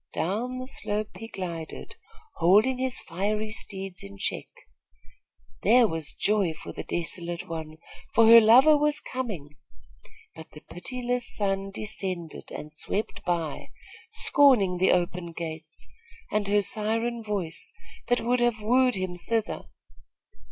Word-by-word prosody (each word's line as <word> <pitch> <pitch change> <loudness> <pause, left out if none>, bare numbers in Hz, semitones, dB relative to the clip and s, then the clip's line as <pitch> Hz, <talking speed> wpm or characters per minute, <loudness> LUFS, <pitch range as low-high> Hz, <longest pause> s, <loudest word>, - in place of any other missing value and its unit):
Down 230 +9 -2
the 255 - -5
slope 210 -5 -2
he 225 - -7
glided, 165 - -6 0.4
holding 215 +9 +4
his 260 -1 -1
fiery 210 +5 -2
steeds 195 -4 -6
in 100 0 -10
check. - - -2 1.1
There 235 +3 +6
was 160 -4 -3
joy 200 -6 +1
for - - -9
the - - -5
desolate 175 +1 -4
one, 160 -2 -6 0.4
for 230 - +7
her 230 +1 +10
lover 255 +8 +7
was 295 0 +2
coming; 185 - -5 0.8
but 160 -1 -11
the 150 - -11
pitiless 245 +7 -3
sun 195 -1 -1
descended 190 -5 -5
and 150 0 -8
swept 200 +7 -3
by, 170 -4 -2 0.4
scorning 230 -11 +4
the 190 - +4
open 175 -1 0
gates, 160 -1 -6 0.4
and 210 -1 0
her 205 0 +3
siren 225 +3 -1
voice, 200 -7 -3 0.4
that 245 - +2
would 245 +2 +1
have 240 -2 +2
wooed 250 +4 +3
him 185 -2 -4
thither. 220 +5 -2
200 Hz, 130 wpm, -27 LUFS, 170-230 Hz, 1.1 s, her